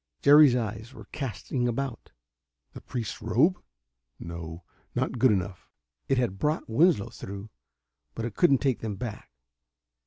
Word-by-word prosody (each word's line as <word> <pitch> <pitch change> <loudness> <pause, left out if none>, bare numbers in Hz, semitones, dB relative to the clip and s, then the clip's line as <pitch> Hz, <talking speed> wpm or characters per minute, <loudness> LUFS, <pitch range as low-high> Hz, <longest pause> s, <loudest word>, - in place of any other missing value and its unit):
Jerry's 145 -2 +8
eyes 115 +1 -4
were 110 - -11
casting 130 -2 -3
about. 120 0 -4 0.6
The - - -9
priest's 120 -5 -5
robe? 170 +9 +2 0.6
No, 85 0 -7 0.3
not 125 - -1
good 130 0 +5
enough. 95 -2 -3 0.4
It 135 - +2
had 115 -6 0
brought 150 +2 0
Winslow 145 - +3
through, 100 +2 -8 0.6
but 115 - -3
it 120 - -4
couldn't 140 - +4
take 135 -4 +1
them 110 -3 -4
back. 105 +1 -6
120 Hz, 135 wpm, -27 LUFS, 105-135 Hz, 0.6 s, Jerry's